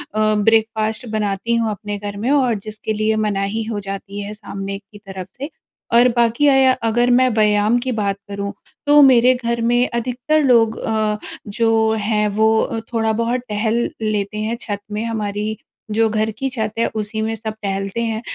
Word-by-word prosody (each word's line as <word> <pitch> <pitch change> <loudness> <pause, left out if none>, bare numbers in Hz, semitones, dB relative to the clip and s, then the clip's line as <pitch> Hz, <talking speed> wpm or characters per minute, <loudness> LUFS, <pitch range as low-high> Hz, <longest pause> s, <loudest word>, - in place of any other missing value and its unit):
अ, - - 0 0.2
breakfast 220 +2 +1
बनाती 210 +2 -1
हूँ 230 -2 +1
अपने 205 0 -5
घर 205 0 -6
में 235 +7 -1
और 260 -5 +3
जिसके 215 0 -4
लिए 215 +1 +1
मनाही 200 +2 -1
हो 205 - -2
जाती 195 +1 -5
है 205 +1 -6
सामने 195 -1 -6
की 205 +1 -17
तरफ़ 190 -1 -7
से। 280 +3 -5 0.4
और 240 +1 +7
बाकी 235 +4 +3
अया 270 -2 +5
अगर 240 +2 +2
मैं 255 +1 +5
व्यायाम 210 +1 +3
की 255 +1 -2
बात 200 -2 -1
करूँ 200 0 -4 0.4
तो 295 0 +7
मेरे 255 -2 +6
घर 235 -1 -2
में 240 +2 +2
अधिकतर 250 +6 0
लोग 230 -4 +4
अ, 215 -1 0 0.3
जो 225 +1 +2
हैं 210 0 +1
वो 220 +1 +2
थोड़ा 225 -1 +1
बहुत 240 +2 0
टहल 220 +3 0 0.2
लेते 210 -1 -1
हैं 220 +2 -2
छत 205 -3 -4
में। 210 +1 -2
हमारी 215 -1 -3 0.3
जो 225 +1 +3
घर 215 0 0
की 270 - -1
छत 220 -4 -3
है, 230 - +3
उसी 220 +1 -2
में 220 +1 -1
सब 220 -1 -5
टहलते 195 +2 -2
हैं 225 -1 -2
220 Hz, 180 wpm, -19 LUFS, 210-235 Hz, 0.4 s, और